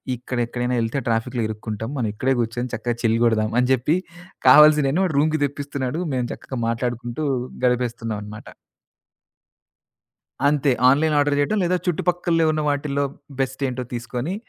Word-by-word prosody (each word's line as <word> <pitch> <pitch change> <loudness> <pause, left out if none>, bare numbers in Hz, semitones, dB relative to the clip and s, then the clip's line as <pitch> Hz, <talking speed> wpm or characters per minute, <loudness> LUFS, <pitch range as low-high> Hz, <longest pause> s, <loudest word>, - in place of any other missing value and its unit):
ఇక్కడ 125 +1 -6
ఎక్కడైనా 125 +1 -2
ఏళ్తే 115 +4 -1
ట్రాఫిక్‌లో 115 +1 -1
ఇరుక్కుంటాం. 110 +1 -5
మనం 115 -4 -1
ఇక్కడే 130 +5 0
కూర్చొని 120 +2 -3
చక్కగా 120 +1 -2
చిల్‌గొడదాం." 115 -1 +2
అని 125 +1 +1
చెప్పి 130 +6 +1 0.5
కావాల్సిన 150 +1 +6
వాడు 165 -6 -2
రూమ్‌కి 155 +1 +1
తెప్పిస్తున్నాడు, 140 +1 -4
మేము 125 -2 -1
చక్కగా 130 - -7
మాట్లాడుకుంటూ, 120 +3 -3 0.4
గడిపేస్తున్నామనమాట. 115 -4 -2 2.0
అంతే. 145 -1 +2 0.2
ఆన్‌లైన్ 150 +3 +2
ఆర్డర్ 145 0 +2
చేయడం. 145 +10 +1
లేదా, 180 +1 +1
చుట్టుపక్కల 175 0 +1
ఉన్న 155 - -1
వాటిలో 145 -1 0 0.4
బెస్టేంటో 130 -1 -2
తీసుకొని, 120 +7 -4
130 Hz, 125 wpm, -22 LUFS, 120-145 Hz, 2.0 s, కావాల్సిన